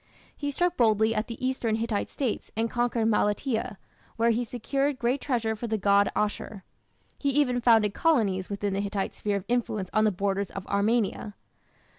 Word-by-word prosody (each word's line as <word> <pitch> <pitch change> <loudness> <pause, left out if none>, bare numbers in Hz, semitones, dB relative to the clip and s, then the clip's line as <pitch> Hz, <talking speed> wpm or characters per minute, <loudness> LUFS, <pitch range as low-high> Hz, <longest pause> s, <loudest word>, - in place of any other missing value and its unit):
He 285 - -3
struck 355 +5 0
boldly 220 -1 +3
at 215 0 -1
the 230 - -6
eastern 250 -4 0
Hittite 225 -2 -2
States 255 -7 -3
and 225 0 0
conquered 240 -1 0
Malatia, 220 +1 0 0.4
where 230 +1 +3
he 235 +2 0
secured 275 +4 -1
great 255 +2 0
treasure 230 -5 -1
for 235 +2 -5
the 220 -1 0
god 200 0 +3
Ashur. 210 -1 -2 0.6
He 280 - 0
even 260 -3 +2
founded 225 -4 +4
colonies 210 - +1
within 200 0 -2
the 195 - 0
Hittite 200 -1 -2
sphere 205 -1 -2
of 200 -1 -3
influence 220 -6 -1
on 215 - +3
the 215 - +3
borders 195 0 -1
of 195 - -7
Armenia. 210 0 0
220 Hz, 175 wpm, -27 LUFS, 205-245 Hz, 0.6 s, founded